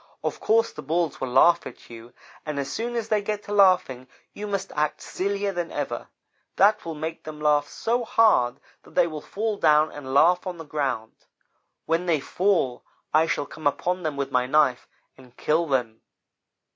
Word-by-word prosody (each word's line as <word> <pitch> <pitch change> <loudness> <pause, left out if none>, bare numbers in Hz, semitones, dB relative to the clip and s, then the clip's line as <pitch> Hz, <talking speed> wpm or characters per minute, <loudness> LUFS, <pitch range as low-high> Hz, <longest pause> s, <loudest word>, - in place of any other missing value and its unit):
Of - - -3
course 225 +1 +2
the 150 - -9
Bulls 160 +1 -1
will 130 - -1
laugh 135 +7 +4
at - - -13
you, 115 +1 -11 0.3
and 150 -2 -5
as 140 -1 -3
soon 240 +2 -3
as 225 -2 -3
they 215 -1 +2
get 210 0 -3
to 205 - -6
laughing 185 -11 +3 0.3
you 210 - -6
must 195 -1 -3
act 150 0 0
sillier 200 +1 -2
than 175 -2 -4
ever. 145 -1 -4 0.5
That 210 +2 +4
will 165 -1 -5
make 160 +2 -5
them 155 +1 -8
laugh 150 -1 +2
so 240 +9 -1
hard 140 - +3 0.2
that - - -19
they - - +5
will 155 -3 -6
fall 215 0 -3
down 155 -2 +4
and 140 -3 -8
laugh 175 +7 +4
on 180 -1 -4
the 165 - -9
ground. 130 -7 -3 0.7
When 165 +2 0
they 160 -3 +2
fall, 170 -5 0 0.3
I 160 +2 +4
shall 145 - -1
come 155 0 -3
upon 180 +5 -1
them 155 -4 -3
with 140 -1 -3
my 125 -1 +1
knife 135 -3 +2 0.3
and 125 -2 -18
kill 165 +2 +1
them. 120 -5 -1
155 Hz, 190 wpm, -25 LUFS, 140-195 Hz, 0.7 s, they